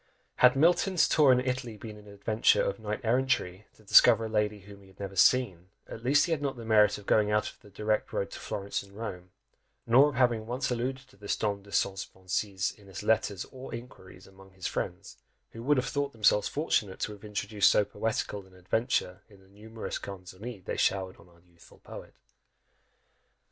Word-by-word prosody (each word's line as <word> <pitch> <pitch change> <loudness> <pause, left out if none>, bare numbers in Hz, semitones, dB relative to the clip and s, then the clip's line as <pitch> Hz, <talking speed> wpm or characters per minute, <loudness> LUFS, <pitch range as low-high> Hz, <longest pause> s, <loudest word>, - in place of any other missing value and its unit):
Had 125 +1 +6
Milton's 175 +4 +3
tour 145 -4 +5
in 125 - +4
Italy 125 -3 -3
been 110 0 -9
an 105 0 -15
adventure 105 +2 +2
of 100 - -2
knight 105 -1 -4
errantry, 115 -5 0
to 110 - -21
discover 110 +2 +6
a - - -5
lady 105 -1 -1
whom 100 +1 -14
he 95 - -18
had 95 - -21
never 100 -1 -6
seen, 95 -4 +3 0.2
at 115 - -9
least 140 +4 +4
he 175 - -4
had 160 -3 0
not 140 -3 -2
the 115 - -8
merit 110 -1 +4
of 105 - -13
going 105 0 +3
out 105 0 0
of - - -24
the 105 - -16
direct 105 +2 -1
road 100 0 -3
to - - -8
Florence 100 0 -4
and 100 0 -16
Rome, 90 -5 -6 0.6
nor 130 +5 +6
of 145 - -7
having 120 -3 +1
once 125 +2 -2
alluded 130 +2 -3
to 115 - -22
this 100 0 -2
Dame 100 -2 -2
de 100 +1 -17
ses 100 0 0
pensées, 95 0 -2
in 100 - -18
his 95 - -8
letters 105 -3 0
or 130 -1 -8
inquiries 95 -6 -12
among 95 0 -17
his 95 -1 -10
friends, 95 +1 -4 0.3
who 115 - -9
would 145 +4 +2
have 130 - +1
thought 140 -1 -2
themselves 105 -2 +3
fortunate 105 - -1
to - - -2
have 105 -1 -12
introduced 105 -1 +1
so 105 - +3
poetical 105 -1 -3
an 95 - -20
adventure 95 0 -1
in 100 -2 -18
the 95 - -22
numerous 110 +3 -7
canzoni 95 +2 -9
they - - -3
showered 95 -1 0
on - - -19
our 85 -1 -23
youthful 85 -1 -21
poet. - - -11
105 Hz, 205 wpm, -29 LUFS, 100-120 Hz, 0.6 s, Had